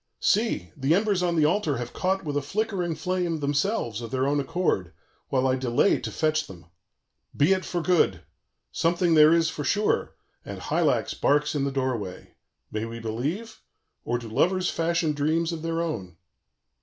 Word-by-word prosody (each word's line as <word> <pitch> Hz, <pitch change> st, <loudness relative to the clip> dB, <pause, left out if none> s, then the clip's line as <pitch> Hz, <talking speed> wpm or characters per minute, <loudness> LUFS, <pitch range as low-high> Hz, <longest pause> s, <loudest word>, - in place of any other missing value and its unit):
_ -, -, -53 dB, 0.2 s
"See! 205 Hz, -, +1 dB
the 140 Hz, +4 st, +2 dB
embers 200 Hz, -2 st, +1 dB
on 175 Hz, -1 st, +1 dB
the 155 Hz, -2 st, +4 dB
altar 155 Hz, -, +1 dB
have 120 Hz, 0 st, -6 dB
caught 190 Hz, +1 st, 0 dB
with 145 Hz, -1 st, -3 dB
a 145 Hz, -, +1 dB
flickering 180 Hz, +1 st, -2 dB
flame, 175 Hz, 0 st, -1 dB
themselves, 145 Hz, -, -1 dB
of 115 Hz, -, -6 dB
their 130 Hz, +1 st, 0 dB
own 145 Hz, +1 st, +1 dB
accord, 135 Hz, -, -1 dB, 0.4 s
while 130 Hz, -1 st, +1 dB
I 130 Hz, -, +2 dB
delay 130 Hz, +7 st, +2 dB
to -, -, -5 dB
fetch 155 Hz, 0 st, 0 dB
them. 85 Hz, -3 st, -12 dB, 0.7 s
Be 150 Hz, +7 st, +5 dB
it 185 Hz, -1 st, -1 dB
for 175 Hz, -2 st, -2 dB
good! 160 Hz, -, +2 dB, 0.5 s
something 170 Hz, 0 st, +1 dB
there 155 Hz, 0 st, +7 dB
is 165 Hz, -1 st, +3 dB
for 145 Hz, -, -5 dB
sure; 205 Hz, +10 st, 0 dB, 0.3 s
and -, -, -7 dB
Hylax -, -, 0 dB
barks 150 Hz, +1 st, +1 dB
in 140 Hz, -2 st, 0 dB
the 140 Hz, -, -1 dB
doorway. 130 Hz, -8 st, -3 dB, 0.4 s
May 110 Hz, +1 st, -2 dB
we 115 Hz, 0 st, -7 dB
believe? 135 Hz, -, -4 dB, 0.4 s
or 120 Hz, -, -1 dB
do 120 Hz, -1 st, -8 dB
lovers 180 Hz, -, +1 dB
fashion 165 Hz, -1 st, 0 dB
dreams 160 Hz, +3 st, 0 dB
of 165 Hz, -2 st, -5 dB
their 165 Hz, +1 st, -1 dB
own? 95 Hz, -, -5 dB
155 Hz, 180 wpm, -26 LUFS, 130-175 Hz, 0.7 s, there